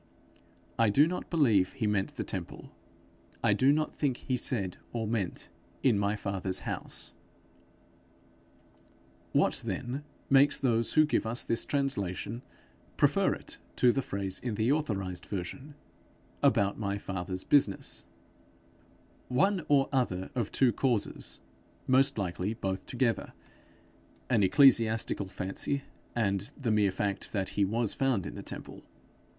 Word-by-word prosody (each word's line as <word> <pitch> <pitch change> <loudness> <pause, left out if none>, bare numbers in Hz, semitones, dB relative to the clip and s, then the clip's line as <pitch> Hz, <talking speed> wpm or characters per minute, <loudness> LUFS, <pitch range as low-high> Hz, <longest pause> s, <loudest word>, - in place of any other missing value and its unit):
I 115 -2 +5
do 140 +9 +5
not 180 +3 -4
believe 115 - +3
he 130 -5 -2
meant 105 -2 0
the - - -3
temple; - - -6 0.7
I - - +4
do 135 +2 +4
not 155 +1 0
think 135 -5 -1
he 130 - -2
said 110 -7 -1 0.2
or 115 -2 -2
meant 105 -5 -2 0.4
'in 120 -7 +4
my 100 +1 +1
fathers 95 -3 -2
house'. - - -4 2.2
What - - +2
then 130 +4 -4 0.2
makes 140 +1 +5
those 115 -4 +1
who 155 - +6
give 150 - 0
us 115 +2 0
this 115 - 0
translation, 115 -5 -2 0.6
prefer - - +3
it - - -6 0.2
to 125 - +5
the 135 - 0
phrase 100 -5 -3
in 120 -4 -3
the 110 +5 +2
authorized 100 -12 -2
version, 130 - -6 0.7
'about 100 0 +3
my 100 -2 -1
Father's 95 -2 -4
business'? 135 -9 +1 1.2
One 175 +9 +2
or 140 -2 +4
other 95 -9 -1
of 120 -6 -2
two 125 -4 +3
causes 120 -2 -1 0.4
most 135 +1 +4
likely 95 +2 -2
both 95 -4 -3
together: 120 -2 -1 1.0
an 115 -4 +4
ecclesiastical 110 -1 +4
fancy, 95 +10 -2 0.3
and 100 -3 0
the 120 -5 0
mere 105 -2 +3
fact 100 +1 -2
that 95 -3 0
he 100 - 0
was 110 +2 +1
found 135 -9 0
in - - -6
the - - -7
temple. - - -8
115 Hz, 135 wpm, -30 LUFS, 100-135 Hz, 2.2 s, who